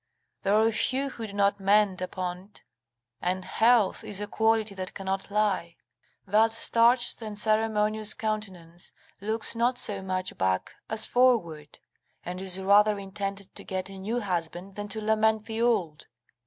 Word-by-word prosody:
There 200 Hz, +1 st, +2 dB
are 220 Hz, +1 st, +4 dB
few 265 Hz, +5 st, 0 dB
who 230 Hz, -4 st, -7 dB
do 200 Hz, -, -10 dB
not 200 Hz, 0 st, +1 dB
mend 195 Hz, -1 st, +3 dB
upon't, 185 Hz, +2 st, -6 dB, 0.6 s
and 185 Hz, +1 st, -2 dB
health 225 Hz, -3 st, +3 dB
is 205 Hz, -2 st, -3 dB
a 205 Hz, -, -2 dB
quality 220 Hz, -1 st, +1 dB
that 185 Hz, -1 st, -6 dB
cannot 195 Hz, 0 st, -3 dB
lie. 205 Hz, -5 st, 0 dB, 0.5 s
That 220 Hz, +3 st, +3 dB
starched 235 Hz, +2 st, +3 dB
and 215 Hz, -2 st, -6 dB
ceremonious 215 Hz, 0 st, +1 dB
countenance 190 Hz, -7 st, -5 dB, 0.3 s
looks 220 Hz, +3 st, +2 dB
not 240 Hz, +2 st, +1 dB
so 200 Hz, -4 st, 0 dB
much 185 Hz, -1 st, -3 dB
back 95 Hz, 0 st, 0 dB, 0.2 s
as 220 Hz, 0 st, -1 dB
forward, 190 Hz, -13 st, +1 dB, 0.5 s
and 180 Hz, +1 st, -5 dB
is 190 Hz, -1 st, 0 dB
rather 205 Hz, +2 st, +4 dB
intended 195 Hz, 0 st, -5 dB
to -, -, -9 dB
get 190 Hz, 0 st, -4 dB
a 195 Hz, -, -9 dB
new 225 Hz, +5 st, -2 dB
husband 180 Hz, 0 st, -4 dB
than 205 Hz, +1 st, -6 dB
to 215 Hz, +2 st, -4 dB
lament 220 Hz, 0 st, +1 dB
the 225 Hz, 0 st, -4 dB
old. 175 Hz, -10 st, 0 dB
205 Hz, 155 wpm, -27 LUFS, 190-220 Hz, 0.6 s, are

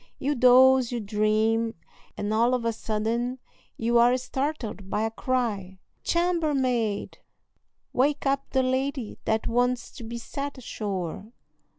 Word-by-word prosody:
You 285 Hz, +2 st, 0 dB
doze, 255 Hz, 0 st, +6 dB
you 240 Hz, -, -2 dB
dream, 215 Hz, +2 st, +1 dB, 0.4 s
and 205 Hz, +1 st, -2 dB
all 235 Hz, +3 st, +3 dB
of 240 Hz, -2 st, -3 dB
a 230 Hz, -, +1 dB
sudden 225 Hz, +4 st, -2 dB, 0.4 s
you 235 Hz, +1 st, +2 dB
are 245 Hz, +2 st, +5 dB
startled 255 Hz, -7 st, -4 dB
by 210 Hz, -, 0 dB
a 225 Hz, -, -1 dB
cry, 220 Hz, -6 st, -2 dB, 0.3 s
"Chambermaid! 275 Hz, -, 0 dB, 0.7 s
wake 285 Hz, +3 st, +1 dB
up 275 Hz, 0 st, 0 dB
the 265 Hz, -1 st, +2 dB
lady 260 Hz, -2 st, -2 dB
that 220 Hz, 0 st, 0 dB
wants 245 Hz, +1 st, 0 dB
to 245 Hz, -, -10 dB
be 230 Hz, +1 st, -5 dB
set 280 Hz, +4 st, -5 dB
ashore." 200 Hz, -4 st, -5 dB
240 Hz, 130 wpm, -26 LUFS, 220-260 Hz, 0.7 s, doze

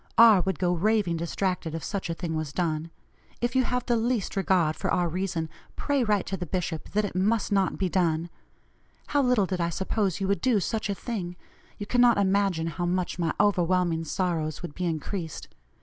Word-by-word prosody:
R. 225 Hz, -5 st, +8 dB
would 190 Hz, -2 st, -1 dB
go 180 Hz, +2 st, +1 dB
raving 195 Hz, -1 st, +1 dB
distracted 170 Hz, 0 st, -2 dB
if 165 Hz, -, -5 dB
such 195 Hz, -4 st, -3 dB
a 165 Hz, -, -1 dB
thing 165 Hz, -2 st, -3 dB
was 155 Hz, -2 st, -3 dB
done. 160 Hz, -1 st, -1 dB, 0.5 s
If 240 Hz, +2 st, -1 dB
you 260 Hz, -, +4 dB
have 250 Hz, 0 st, -1 dB
the 240 Hz, -, +2 dB
least 230 Hz, -3 st, 0 dB
regard 180 Hz, -5 st, +2 dB
for -, -, -3 dB
our 175 Hz, -1 st, +2 dB
reason, 170 Hz, -1 st, -2 dB, 0.3 s
pray 285 Hz, -3 st, 0 dB
write 210 Hz, -4 st, +1 dB
to 195 Hz, -, -3 dB
the 180 Hz, -, -5 dB
bishop 170 Hz, -2 st, -3 dB
that 210 Hz, +1 st, +2 dB
it 205 Hz, -, -5 dB
must 210 Hz, +4 st, +1 dB
not 195 Hz, -2 st, +2 dB
be 190 Hz, -, 0 dB
done. 170 Hz, -2 st, 0 dB, 0.8 s
How 285 Hz, -, +3 dB
little 250 Hz, -6 st, +3 dB
did 185 Hz, -1 st, -2 dB
I 170 Hz, -, +1 dB
suppose 190 Hz, +1 st, -1 dB
you 195 Hz, -, -1 dB
would 200 Hz, 0 st, 0 dB
do 245 Hz, -4 st, +3 dB
such 215 Hz, +2 st, -2 dB
a 200 Hz, -, 0 dB
thing; 185 Hz, -6 st, -4 dB, 0.4 s
you 205 Hz, -, -5 dB
cannot 245 Hz, +1 st, +4 dB
imagine 195 Hz, -4 st, +2 dB
how 175 Hz, +2 st, -2 dB
much 180 Hz, 0 st, -1 dB
my 165 Hz, -2 st, +1 dB
overwhelming 180 Hz, -4 st, +2 dB
sorrows 165 Hz, -2 st, -2 dB
would 170 Hz, -, -6 dB
be 180 Hz, -, -3 dB
increased. 165 Hz, +1 st, -4 dB
185 Hz, 200 wpm, -27 LUFS, 170-205 Hz, 0.8 s, R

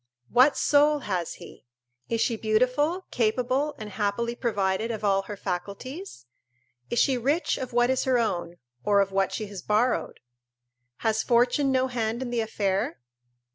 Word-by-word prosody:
What 255 Hz, +4 st, +5 dB
soul 295 Hz, 0 st, +4 dB
has 180 Hz, -7 st, -3 dB
he? -, -, -14 dB, 0.4 s
Is 230 Hz, -1 st, 0 dB
she 230 Hz, 0 st, +1 dB
beautiful, 255 Hz, -, +1 dB
capable, 250 Hz, +5 st, 0 dB
and 215 Hz, -1 st, -8 dB
happily 210 Hz, +4 st, -1 dB
provided 215 Hz, -3 st, -1 dB
of 220 Hz, -2 st, -4 dB
all 195 Hz, -1 st, +3 dB
her 205 Hz, +1 st, -8 dB
faculties? 200 Hz, -, -6 dB, 0.6 s
Is 240 Hz, -, -2 dB
she 260 Hz, -1 st, +3 dB
rich 285 Hz, +8 st, +1 dB
of 255 Hz, -1 st, -5 dB
what 240 Hz, +1 st, +3 dB
is 260 Hz, -, 0 dB
her 260 Hz, -1 st, +3 dB
own, 175 Hz, -7 st, -1 dB, 0.3 s
or 205 Hz, -1 st, +3 dB
of 195 Hz, -1 st, +2 dB
what 195 Hz, 0 st, +1 dB
she 215 Hz, -, -3 dB
has 200 Hz, -3 st, -8 dB
borrowed? 220 Hz, +4 st, 0 dB, 0.9 s
Has 220 Hz, 0 st, +2 dB
fortune 245 Hz, +4 st, +2 dB
no 260 Hz, 0 st, +2 dB
hand 235 Hz, -1 st, -2 dB
in 245 Hz, -, -5 dB
the 235 Hz, -1 st, 0 dB
affair? 200 Hz, -, -1 dB
230 Hz, 160 wpm, -26 LUFS, 205-255 Hz, 0.9 s, What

